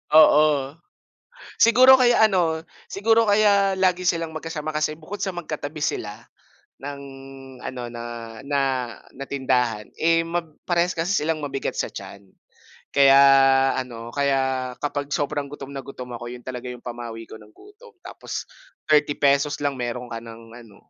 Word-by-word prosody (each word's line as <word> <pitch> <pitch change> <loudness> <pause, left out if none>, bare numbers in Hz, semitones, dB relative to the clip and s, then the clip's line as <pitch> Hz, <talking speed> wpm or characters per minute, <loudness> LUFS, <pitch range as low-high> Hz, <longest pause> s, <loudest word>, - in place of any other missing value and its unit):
Oo. 150 -3 +5 0.9
Siguro 255 +3 +7
kaya 240 -3 +5
ano, 170 -6 0 0.3
siguro 225 +3 +2
kaya 205 -2 +4
lagi 185 -1 +2
silang 165 -2 0
magkasama 155 -1 -5
kasi 155 0 0
bukod 175 +6 -8
sa 195 - 0
magkatabi 155 -3 -6
sila 105 -5 -3 0.6
ng 140 0 -7 0.6
ano, 125 -1 -5
na 120 -1 -7 0.4
na 140 0 0 0.6
na 140 - -6
tindahan, 125 -6 0
eh, 165 +1 +3
ma 170 +1 -2 0.2
parehas 175 0 +2
kasi 165 +4 -1
silang 160 0 -1
mabigat 135 -1 -3
sa - - -1
tiyan. 100 -1 -10 0.6
Kaya 140 -1 +6 0.6
ano, 120 -2 -6
kaya 130 -2 0
kapag 145 -1 -3
sobrang 145 0 -1
gutom 140 -1 -9
na 135 - -5
gutom 125 -2 -9
ako 120 - -9
'yon 125 - -10
talaga 125 -1 -6
'yong 125 -1 -9
pamawi 120 -2 -7
ko - - -9
ng 105 0 -18
gutom 440 +3 -17
tapos - - -7 0.4
₱30 145 -1 +2
lang 140 -2 -1
mayro'n 120 0 -4
ka 115 - -5
ng 115 0 -12
ano, 115 -4 -17
145 Hz, 145 wpm, -23 LUFS, 125-165 Hz, 0.9 s, Siguro